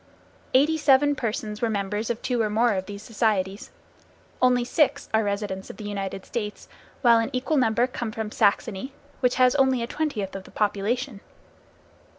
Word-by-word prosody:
Eighty 305 +4 +4
seven 290 0 +5
persons 215 -3 -3
were 230 - +1
members 205 +1 -2
of 235 -1 -3
two 245 -2 0
or 215 - +1
more 230 +2 +3
of 190 -1 -3
these 205 0 -8
societies. 205 -4 -1 0.7
Only 250 -1 +4
six 295 +3 +1
are 220 0 +3
residents 200 -2 -3
of - - -9
the - - -8
United 195 -2 -4
States, 210 -3 -5 0.4
while 235 -2 +6
an 225 - -1
equal 260 +4 0
number 235 -2 +3
come 240 -3 -4
from 220 -1 -4
Saxony, 210 +4 0 0.3
which 250 -1 +2
has 255 -1 +5
only 265 -3 +3
a - - 0
twentieth 235 -9 -3
of 190 -1 -7
the - - -13
population. 215 +4 -1
225 Hz, 170 wpm, -25 LUFS, 205-250 Hz, 0.7 s, while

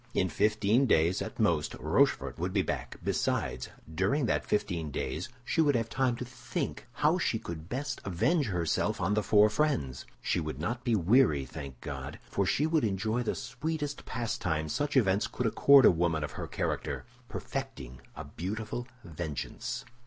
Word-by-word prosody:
In 95 - +2
fifteen 105 - +3
days 85 -1 +3
at - - -6
most, - - +2
Rochefort - - +1
would 90 +2 -1
be 100 -2 +2
back; - - -4
besides, 60 -1 -1 0.2
during 100 - +1
that - - +1
fifteen 85 -6 -1
days 70 +4 -3 0.2
she 165 - +2
would 145 -3 +3
have 115 -1 0
time 130 -1 +1
to 125 - -5
think 125 +1 -5
how - - +2
she - - +1
could 85 0 -7
best 135 +1 -3
avenge 130 - +1
herself 85 -5 0
on 95 +4 +1
the 105 - +2
four 105 0 +5
friends. 105 - 0
She - - 0
would 75 -4 -4
not 120 +10 -2
be 120 -3 +2
weary, 95 - +4
thank 65 -1 -8
God! - - -6
for 100 - +1
she 100 +9 +2
should 160 -2 +2
enjoy 110 +3 0
the 120 - -1
sweetest 145 +3 -4
pastime 110 -10 -2
such 145 - 0
events 100 -4 +3
could 125 - -3
accord 140 +4 +7
a - - +9
woman 85 -2 +1
of 75 - -4
her - - -5
character—perfecting 120 - -5
a - - -6
beautiful 105 - -4 0.2
vengeance. 80 -4 -5
105 Hz, 165 wpm, -30 LUFS, 85-125 Hz, 0.2 s, a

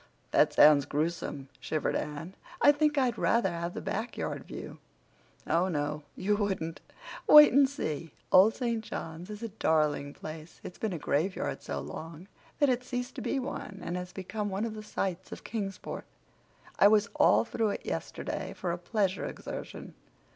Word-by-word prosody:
"That - - +4
sounds 145 -2 +7
gruesome," 150 -2 -2
shivered 155 +4 -1
Anne. 150 +4 -4 0.3
"I 290 - +7
think 295 0 +1
I'd 250 -4 +2
rather 230 -6 +2
have 170 +1 -4
the - - -4
back 225 +4 -3
yard - - -3
view." - - -8 0.7
"Oh, 170 +3 +2
no, 150 -3 -2
you 205 +2 +1
wouldn't. 190 -6 -2 0.5
Wait 300 -3 +10
and 275 0 +6
see. 165 - -4 0.2
Old 200 +4 +7
St. 235 -3 -1
John's 165 -2 -6
is 210 +2 -7
a 230 - -3
darling 150 -7 +1
place. 155 +1 -9
It's 180 - -9
been 220 - -1
a - - -2
graveyard 150 - -1
so - - -4
long 165 +3 -8 0.3
that 290 - +4
it's 250 -1 0
ceased 245 0 -3
to - - -6
be - - -1
one 255 -6 -5
and 175 - -3
has 180 0 -5
become 205 +3 -4
one 195 +3 -1
of 225 - -4
the 215 - -7
sights 190 -3 -3
of - - -8
Kingsport. 200 -4 -5 0.7
I - - +8
was 210 +1 +4
all - - +5
through 225 -1 0
it - - -4
yesterday - - -4
for 180 - -2
a 175 - -3
pleasure 195 0 0
exertion. - - -7
190 Hz, 175 wpm, -30 LUFS, 160-225 Hz, 0.7 s, Wait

